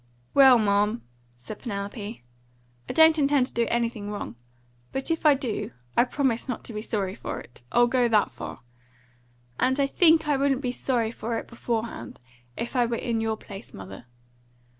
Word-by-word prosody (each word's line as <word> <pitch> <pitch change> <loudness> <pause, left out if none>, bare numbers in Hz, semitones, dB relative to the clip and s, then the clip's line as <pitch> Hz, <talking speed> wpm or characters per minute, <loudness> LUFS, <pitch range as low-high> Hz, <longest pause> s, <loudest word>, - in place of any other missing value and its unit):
"Well, 265 -3 +8
ma'am," 210 +1 +1 0.3
said 125 - -9
Penelope, 205 - -5 0.7
"I - - 0
don't 320 -1 +6
intend 280 -2 +3
to - - -13
do 235 -1 +1
anything 230 -3 -1
wrong; 205 - -5 0.6
but 270 +5 -2
if 325 -1 +2
I 290 - +7
do, 250 -5 -3 0.2
I 240 - +5
promise 260 -2 -1
not 250 - -3
to 235 - -6
be 210 - -4
sorry 200 -4 -2
for 220 - -5
it. 120 - -12
I'll 240 - +5
go 245 0 +2
that 215 -3 +3
far. - - -8 1.0
And 260 +2 +2
I 280 - +4
think 320 +2 +4
I 290 -2 +2
wouldn't 275 -1 +1
be 250 -3 -1
sorry 240 -3 0
for 230 0 -3
it - - -6
beforehand, 230 - -4 0.4
if 235 - -4
I 245 -2 +3
were 235 - -1
in 230 -1 -1
your 220 -1 -1
place, 195 -1 -11
mother. 95 +4 -10
235 Hz, 180 wpm, -26 LUFS, 210-265 Hz, 1.0 s, Well